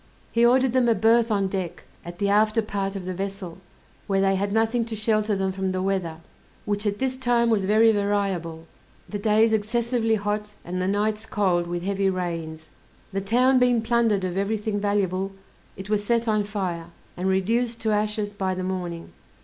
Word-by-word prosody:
He 235 - +2
ordered 255 +1 +4
them 255 -2 +3
a 230 - +4
berth 225 +3 +3
on 200 -2 +1
deck, 185 -3 -4 0.2
at 175 +1 -9
the 200 - 0
after 215 +2 +3
part 195 -1 -3
of 190 -2 -5
the 185 - -3
vessel, 195 -2 -5 0.5
where 195 -1 +1
they 195 0 +3
had 200 +1 -1
nothing 225 +2 +1
to 225 -1 -5
shelter 215 -1 +1
them 190 0 -1
from 190 0 -2
the 185 - -1
weather, 185 -4 -1 0.5
which 205 +1 -1
at 205 0 -1
this 260 +1 -1
time 240 -2 +2
was 200 -4 +2
very 220 +3 +5
variable, 195 -6 -1 0.4
the 205 - -5
days 220 +1 +3
excessively 225 +1 +1
hot, 210 0 -3
and 185 +1 -3
the 185 - 0
nights 210 +2 -1
cold, 180 -4 +1
with 175 0 -3
heavy 195 0 +1
rains. 165 -4 -4 0.4
The 195 - -1
town 250 +6 +3
being 245 -2 +3
plundered 225 -4 +2
of 185 0 -2
every 200 +3 0
thing 210 0 -2
valuable, 195 -2 0 0.4
it 190 +1 -7
was 210 -1 0
set 235 +2 +1
on 215 -2 +1
fire, 185 -5 -3 0.3
and 180 +2 -2
reduced 230 +5 0
to 220 - 0
ashes 210 0 -1
by 190 -2 -2
the 185 - -4
morning. 180 -3 -4
205 Hz, 190 wpm, -24 LUFS, 190-220 Hz, 0.5 s, very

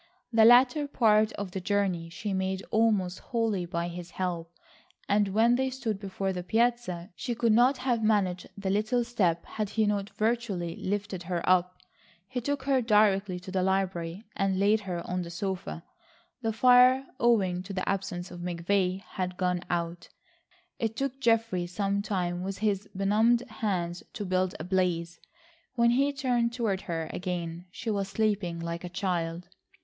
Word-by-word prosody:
The 225 -1 +6
latter 250 +5 +6
part 220 -5 +3
of 200 -2 -5
the 190 - -4
journey 185 -4 0
she 200 +4 -4
made 190 0 -1
almost 210 -5 +2
wholly 220 -7 -1
by 170 0 -2
his 175 0 -7
help, 175 -3 -3 0.6
and 205 0 +3
when 220 +5 +3
they 265 0 +1
stood 240 -6 -3
before 195 -1 -3
the 180 - -3
piazza, 220 -3 0
she 240 +4 -3
could 230 0 +2
not 245 +5 +5
have 250 -3 0
managed 195 -4 +1
the 195 -1 -2
little 220 +5 +1
step 185 -8 0
had 215 -2 -3
he 220 0 +1
not 205 -1 -1
virtually 215 -6 -1
lifted 200 -1 -3
her 175 -1 -3
up. 180 0 +3 0.5
He 250 +1 -3
took 285 +2 -2
her 270 -1 +2
directly 205 -4 +3
to 185 - -9
the 190 -1 0
library 185 -1 -1
and 195 -1 +1
laid 205 +3 +3
her 180 -4 -5
on 180 0 -1
the 170 - -6
sofa. 170 - -4 0.6
The 225 - 0
fire, 250 +3 +6
owing 195 -7 +3
to 190 +2 -9
the 185 -1 -3
absence 190 -2 -2
of 175 - -8
McVay, 180 +2 0
had 180 0 -4
gone 180 -1 0
out. 170 0 -3 0.7
It 225 -1 -1
took 270 +1 -3
Geoffrey 225 -7 +1
some 200 +2 -1
time 180 -4 -2
with 195 +1 -4
his 205 -1 -1
benumbed 220 +5 +3
hands 185 -6 -2
to 205 - -4
build 185 0 0
a - - -4
blaze. 175 -2 0 0.6
When 235 -1 +4
he 275 +4 +3
turned 245 -4 0
toward 220 -6 -1
her 165 -1 -2
again 175 -2 -4
she 220 +5 -4
was 200 -2 -1
sleeping 200 -5 0
like 170 +1 -4
a 180 - -5
child. 175 -2 -2
195 Hz, 170 wpm, -28 LUFS, 180-225 Hz, 0.7 s, The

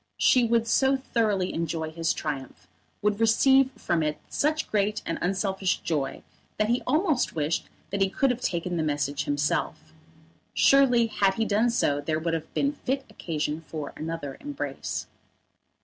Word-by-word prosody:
She 255 - +5
would 230 0 +2
so 265 +3 +3
thoroughly 215 -7 0
enjoy 160 -1 -2
his 165 0 0
triumph, 135 -9 -5 0.4
would 210 0 +1
receive 265 +4 +5
from 170 -1 -1
it 150 -1 -1
such 310 +2 0
great 210 0 0
and 165 - -3
unselfish 190 +1 0
joy, 150 -4 -2 0.3
that 215 +1 +1
he 240 +1 +2
almost 305 - +1
wished 155 +1 -1 0.2
that 200 0 -2
he 195 - +3
could 270 +6 +2
have 250 0 -4
taken 175 -2 -1
the - - +1
message 145 -1 -1
himself. 145 +2 -1 0.6
Surely 260 -4 +5
had 200 -3 +1
he 225 - 0
done 220 +3 +2
so 145 -11 +1
there 155 +2 -1
would 165 +1 -2
have 160 -1 -3
been 280 - +2
fit 270 -1 -3
occasion 155 -1 -3
for 150 -3 -6
another 160 -3 -5
embrace. 290 0 -4
190 Hz, 160 wpm, -26 LUFS, 155-240 Hz, 0.6 s, She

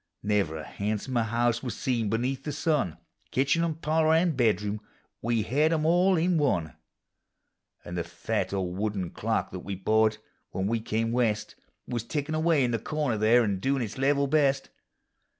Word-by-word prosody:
Never 100 -6 +1
a 80 - -6
handsomer 110 - -2
house 120 +1 +1
was 125 -4 -5
seen 115 -5 0
beneath 125 +5 -1
the 150 - -3
sun: 145 - 0 0.3
Kitchen 140 +6 +2
and 160 -2 -2
parlor 160 +1 +3
and 165 -1 +2
bedroom 105 -3 +1 0.2
— - - -44
we 115 -1 +1
hed 145 +8 +2
'em 155 -2 +1
all 180 +3 +4
in 170 0 +2
one; 85 - 0 1.1
And 85 - -6
the 85 - -1
fat - - -3
old 95 -2 -2
wooden 100 -5 -2
clock, - - -1
that - - -5
we 100 - -5
bought 110 +3 +2 0.3
when 95 - -3
we 115 +3 0
come 115 +1 -1
West. 115 -3 0 0.3
Was 120 -3 -2
tickiu' 145 +4 -3
away 160 -3 +3
in 120 - +1
the 115 - 0
corner 150 -1 -1
there, 115 +3 +5
and 100 -4 -1
doin' 135 -1 +1
its 115 +3 -6
level 140 +1 +3
best. 140 -1 +1
120 Hz, 180 wpm, -27 LUFS, 105-145 Hz, 1.1 s, there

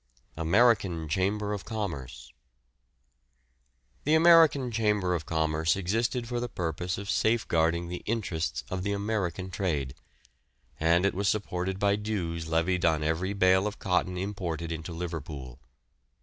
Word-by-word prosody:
AMERICAN 90 -1 +2
CHAMBER 100 +6 0
OF 100 - -4
COMMERCE. 70 - -5 1.7
The 150 +2 +3
American 160 -6 +6
Chamber 105 -5 +1
of 80 -3 -3
Commerce 80 0 +1
existed 115 +6 -1
for 120 0 -2
the 120 0 -3
purpose 85 0 -3
of 100 +1 -6
safeguarding 85 -7 +1
the 90 +1 -5
interests 95 -8 -2
of 95 0 -2
the 100 +2 -1
American 100 -3 -2
trade, 75 -10 -2 0.9
and 85 +3 +3
was 100 +1 0
supported 95 -2 -2
by 100 0 +2
dues 85 -6 -3
levied 85 +3 +1
on 80 -2 +2
every 80 +5 -1
bale 95 0 +4
of 105 - -5
cotton 90 -1 0
imported 90 -4 -3
into 80 +1 -5
Liverpool. 80 -7 -6
90 Hz, 130 wpm, -28 LUFS, 80-105 Hz, 1.7 s, American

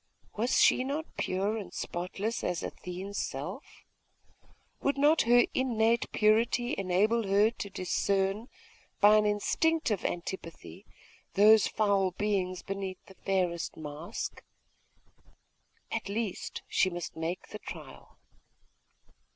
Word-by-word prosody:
Was 235 +4 +1
she 255 - +5
not 290 +4 -2
pure 195 +4 -1
and 205 - -7
spotless 195 +6 -3
as 175 -3 -1
Athene's 190 +3 -5
self? - - -6 1.0
Would 280 0 +1
not 295 +3 +5
her 240 0 +7
innate 235 -3 +1
purity 230 +3 +2
enable 195 +4 +1
her 205 +3 +4
to 210 -3 -6
discern, 195 +3 0 0.5
by 210 +1 +7
an 210 0 +3
instinctive 220 - +1
antipathy, 165 - -6 0.5
those 215 +1 +7
foul 200 -3 +2
beings 190 -3 -1
beneath 195 -1 -5
the 190 - -14
fairest 185 -3 -1
mask? 150 +1 -6 1.5
At 225 -3 -3
least, 210 -2 -3
she 185 - +2
must 175 -1 -6
make 165 +3 -4
the - - -7
trial.... - - -10
200 Hz, 110 wpm, -30 LUFS, 185-225 Hz, 1.5 s, her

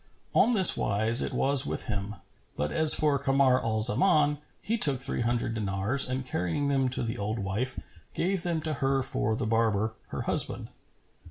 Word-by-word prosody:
On 245 - +2
this 190 -4 +8
wise 110 +4 +2
it - - -3
was 140 0 +4
with - - -4
him; 105 -1 -5 0.4
but 75 +1 -3
as 160 -1 +6
for 150 -2 0
Kamar 135 -1 +1
al 110 -1 -2
Zaman, 150 - +1 0.2
he 225 - -3
took 140 - +3
three 135 -1 -4
hundred 115 -1 -2
dinars 105 +5 0
and 130 0 -4
carrying 125 - -3
them 135 -2 0
to 125 - -2
the 115 0 -5
old 105 +3 -4
wife, 105 +6 -4 0.4
gave 185 +1 -2
them 170 -2 -3
to 155 0 -4
her 135 0 0
for 110 -3 -2
the 125 0 -4
barber, 110 -1 -1
her - - -6
husband. - - 0
130 Hz, 180 wpm, -26 LUFS, 110-140 Hz, 0.4 s, this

